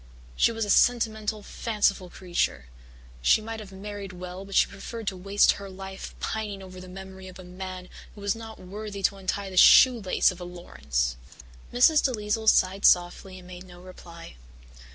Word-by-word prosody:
"She - - +3
was 225 -1 -2
a 205 - 0
sentimental, 220 -3 +2
fanciful 200 -4 -1
creature. 175 - -2 0.6
She - - +4
might 225 +1 -7
have 205 -3 -10
married 200 0 -8
well 180 +1 -8
but 195 -1 -8
she - - +6
preferred 220 +3 -8
to 190 - -9
waste 195 +2 +3
her 200 -1 -7
life 190 0 -9
pining 210 -3 -4
over 185 -1 -11
the 185 - -11
memory 190 0 -10
of 185 - -11
a 185 - -11
man 185 0 -8 0.3
who 205 - -12
was 200 0 0
not 225 -1 -10
worthy 200 +2 -8
to 200 - +1
untie 195 +1 -3
the 185 - -8
shoelace 225 -4 +6
of 180 0 -11
a - - -5
Laurance." 70 - -3 0.5
Mrs. 295 +5 +5
DeLisle 220 -3 -1
sighed 190 +1 +2
softly 180 +2 +2
and 180 -1 -13
made 180 0 -10
no 175 -1 -14
reply. 170 - -12
195 Hz, 175 wpm, -26 LUFS, 180-210 Hz, 0.6 s, she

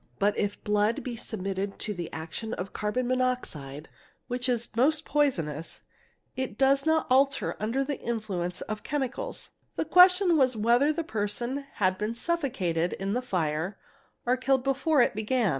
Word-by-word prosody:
But 205 +1 +2
if 205 0 -2
blood 210 +2 +1
be 245 -2 -4
submitted 195 -3 -4
to 210 - -2
the 175 -3 -6
action 165 +8 -5
of 185 +2 -6
carbon 210 +4 -1
monoxide, 245 - -2 0.4
which 245 +1 -2
is 235 -1 0
most 300 +6 +2
poisonous, 165 - 0 0.5
it 260 -5 -3
does 275 +2 +3
not 320 0 +3
alter 275 +2 +2
under 230 +6 0
the 285 0 -3
influence 195 -7 -3
of 215 -1 -4
chemicals; 290 - -3 0.2
the - - -1
question 360 +1 +6
was 260 -3 +3
whether 240 +7 +4
the 330 +2 -2
person 240 +4 -3
had 185 -2 +1
been 215 +2 -2
suffocated 230 - -1
in 195 +1 -3
the 250 - 0
fire 180 -4 -2 0.5
or 250 +1 +2
killed 265 0 +2
before 275 +1 +3
it - - +1
began. 220 +1 +1
235 Hz, 160 wpm, -28 LUFS, 200-270 Hz, 0.5 s, question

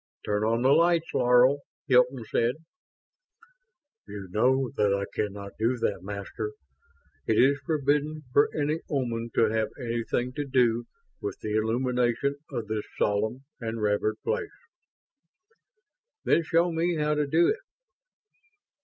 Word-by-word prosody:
"Turn 105 0 0
on 115 +2 +1
the 130 - +4
lights, 165 +2 +3
Laro," 125 +3 +4 0.3
Hilton 125 -3 +3
said. 115 +3 +1 1.5
"You 100 -2 -8
know 130 +5 +2
that 105 -4 +2
I 100 0 -2
cannot 100 -1 -3
do 120 +3 +1
that, 105 -5 -1
Master. 100 +2 -5 0.7
It 110 - +2
is 140 +3 +4
forbidden 150 0 0
for 145 - +5
any 150 +1 -1
Oman 120 -4 -2
to 110 -2 +3
have 110 -1 0
anything 120 +1 -2
to 145 +1 -3
do 120 -3 +2 0.4
with 405 - -4
the 105 0 -2
illumination 125 +4 0
of 120 -5 -4
this 110 -1 -3
solemn 110 +6 0
and 115 -1 -4
revered 105 +1 0
place." 420 - -1 1.8
"Then - - +4
show 170 +2 +2
me 170 +1 0
how 150 -1 +1
to 150 -1 0
do 165 +4 +4
it." 435 - 0
125 Hz, 135 wpm, -27 LUFS, 110-145 Hz, 1.8 s, for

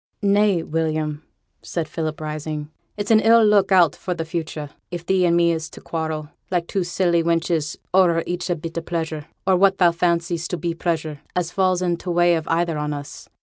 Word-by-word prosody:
'Nay, 200 -3 +3
William,' 155 -1 -2 0.4
said 165 -3 -3
Philip, 155 -1 -4
rising, 155 0 -5 0.3
'it's 205 +1 -2
an 220 - +7
ill 225 +1 +6
look 205 -2 +4
out 180 -4 +5
for 180 - -4
the 165 -1 -3
future, 160 -3 -5 0.2
if 175 -1 -6
thee 185 -1 +3
and 170 0 +3
me 170 0 +4
is 160 -1 -3
to - - -12
quarrel, 160 -2 -4 0.2
like 175 -2 0
two 190 +1 -1
silly 175 -1 +1
wenches, 165 -2 0 0.2
o'er 175 -3 +4
each 175 +1 -3
bit 165 +1 -7
of 165 - -3
pleasure, 160 -3 -3 0.2
or 190 0 +4
what 195 +1 +4
thou 175 -2 +5
fancies 170 0 0
to 180 - -3
be 170 +1 -2
pleasure, 160 -3 -2 0.2
as 175 -2 -1
falls 185 -1 +1
in 175 -1 0
t' 180 - -7
way 175 0 +4
of 160 -2 -1
either 165 -1 0
on 150 0 -2
us. 145 -1 -8
170 Hz, 200 wpm, -22 LUFS, 160-180 Hz, 0.4 s, an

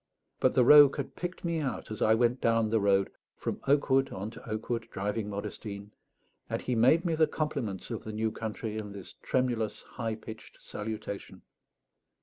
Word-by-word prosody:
But - - +2
the 125 - +5
rogue 145 +1 +8
had 140 - -4
picked 175 0 -5
me 170 -1 0
out 135 -6 -3
as 110 - -6
I 110 - +5
went 120 +2 +2
down 115 -1 +2
the 110 0 +2
road, 100 -1 +2 0.3
from - - -4
oak 140 0 +3
wood 135 0 +4
on 100 +3 -5
to 115 - -11
oak 110 0 -4
wood, 115 -2 -2
driving 105 +2 -2
Modestine; 100 0 -6 0.6
and - - -1
he 125 - -2
made 130 +10 +4
me 170 - +1
the 160 0 +4
compliments 130 - -3
of 115 - -4
the 110 - -6
new 110 +1 -1
country 110 0 -4
in 105 -2 -7
this 100 -2 -9
tremulous 120 -4 -1
high 115 -2 -4
pitched 110 0 -11
salutation. 105 -1 -6
110 Hz, 185 wpm, -30 LUFS, 105-130 Hz, 0.6 s, rogue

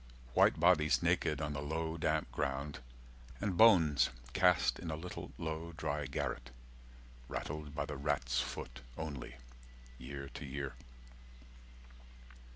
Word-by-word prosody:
White - - +5
bodies 75 -5 +4
naked 75 - +2
on 75 -1 -2
the 70 - -3
low 80 +2 -2
damp 80 - 0
ground 70 +1 -2 0.6
And 100 -3 -1
bones 85 -9 +6 0.2
cast 90 -1 +4
in 85 - -5
a 80 - -1
little 90 +3 -7
low 80 +1 -4
dry 75 -2 -2
garret, 60 -2 -3 0.8
Rattled 75 +2 -5
by - - -1
the 75 - -5
rat's 65 -3 +1
foot - - -6 0.2
only, 70 -6 -5 0.6
year 70 +2 -6
to - - -8
year. 70 -1 -4
75 Hz, 125 wpm, -35 LUFS, 70-80 Hz, 0.8 s, bones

